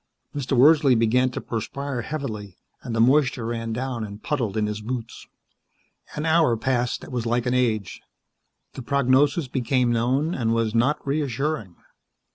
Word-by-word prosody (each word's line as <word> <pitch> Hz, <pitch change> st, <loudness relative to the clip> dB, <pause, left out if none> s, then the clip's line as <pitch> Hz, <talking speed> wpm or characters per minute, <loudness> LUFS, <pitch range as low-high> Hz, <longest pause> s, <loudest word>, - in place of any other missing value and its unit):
Mr. 135 Hz, -2 st, -1 dB
Wordsley 140 Hz, -1 st, +6 dB
began 125 Hz, +3 st, +3 dB
to 125 Hz, -, -5 dB
perspire 125 Hz, +3 st, -4 dB
heavily, 110 Hz, -, -5 dB, 0.2 s
and 115 Hz, -, -5 dB
the -, -, 0 dB
moisture 125 Hz, -1 st, +3 dB
ran 115 Hz, 0 st, -3 dB
down 125 Hz, 0 st, -3 dB
and 105 Hz, 0 st, -8 dB
puddled 115 Hz, -8 st, -2 dB
in 105 Hz, -, +1 dB
his 105 Hz, 0 st, -4 dB
boots. 115 Hz, +1 st, -6 dB, 0.9 s
An 150 Hz, -, -3 dB
hour 160 Hz, -7 st, +3 dB
passed 125 Hz, 0 st, -1 dB
that -, -, -11 dB
was 120 Hz, -2 st, -2 dB
like 120 Hz, +1 st, 0 dB
an 125 Hz, -, 0 dB
age. 110 Hz, -7 st, 0 dB, 0.7 s
The -, -, -7 dB
prognosis 140 Hz, +3 st, +2 dB
became 125 Hz, 0 st, 0 dB
known 130 Hz, +8 st, +1 dB
and 115 Hz, -5 st, 0 dB
was 115 Hz, -2 st, 0 dB
not 125 Hz, +6 st, +1 dB
reassuring. 140 Hz, -, -2 dB
125 Hz, 155 wpm, -24 LUFS, 115-140 Hz, 0.9 s, Wordsley